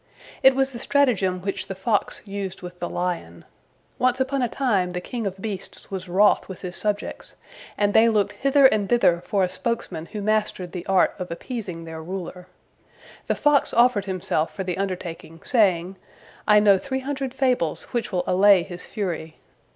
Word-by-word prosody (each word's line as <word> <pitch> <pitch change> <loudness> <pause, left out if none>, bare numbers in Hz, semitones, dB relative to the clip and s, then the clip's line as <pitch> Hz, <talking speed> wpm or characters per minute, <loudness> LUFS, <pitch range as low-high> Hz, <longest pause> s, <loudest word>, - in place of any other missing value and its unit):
It 265 -1 +6
was 270 0 +1
the 240 - -7
stratagem 220 -11 +2
which 195 +1 -3
the 195 - -5
fox 205 +2 -1
used 195 -2 -5
with 180 0 -9
the 175 - -3
lion. 175 - -4 0.5
Once 255 +1 +2
upon 265 +1 0
a 245 - +1
time 205 -10 +1
the 180 0 -3
king 225 +3 -4
of 190 0 -6
beasts 195 -2 -6
was 185 -2 -5
wroth 200 +4 +3
with 190 - -8
his 180 -1 -6
subjects, 210 -1 -3 0.4
and 205 0 +2
they 225 +1 +6
looked 205 -2 +1
hither 275 0 +3
and 215 -6 +4
thither 180 -8 +3
for 195 0 0
a - - +3
spokesman 180 -6 -3
who 210 +2 -6
mastered 210 -4 0
the 180 -1 -7
art 190 -1 +3
of 180 - -5
appeasing 180 -1 -6
their 160 -1 -7
ruler. 180 +1 -7 0.8
The - - +1
fox 295 -2 +2
offered 235 -4 +4
himself 185 -4 -2
for 190 - -3
the 180 0 -3
undertaking, 175 -4 -5
saying, 190 -5 +2 0.5
"I 210 -1 +7
know 200 -2 +5
three 265 +2 -3
hundred 270 -1 -3
fables 255 - 0
which 240 -1 -2
will 180 -2 0
allay 190 0 +5
his 175 0 -9
fury." 170 -6 -4
195 Hz, 180 wpm, -24 LUFS, 180-235 Hz, 0.8 s, I